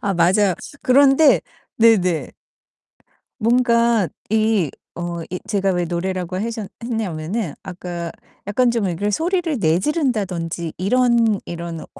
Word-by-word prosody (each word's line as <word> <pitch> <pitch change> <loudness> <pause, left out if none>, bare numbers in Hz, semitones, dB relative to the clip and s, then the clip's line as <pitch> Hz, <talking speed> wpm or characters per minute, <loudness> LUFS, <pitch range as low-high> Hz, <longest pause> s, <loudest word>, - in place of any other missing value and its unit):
아 200 -2 0
맞아요. 185 +3 +3 0.3
그런데 280 +2 +5 0.4
네네. 190 -7 +3 1.1
뭔가 235 -2 +3 0.2
이 215 -7 +2 0.3
어 170 0 -4
이 180 - -3
제가 195 -2 0
왜 175 -1 0
노래라고 180 +1 -3
하셨 220 -1 -3 0.2
했냐면은 195 - -3
아까 175 -2 -6 0.4
약간 240 +4 +2
좀 230 -4 0
이렇게 190 +4 -1
소리를 335 - 0
내지른다든지 180 - -1
이런 230 +1 +2
이런 170 -1 -6
200 Hz, 240 characters per minute, -20 LUFS, 175-235 Hz, 1.1 s, 그런데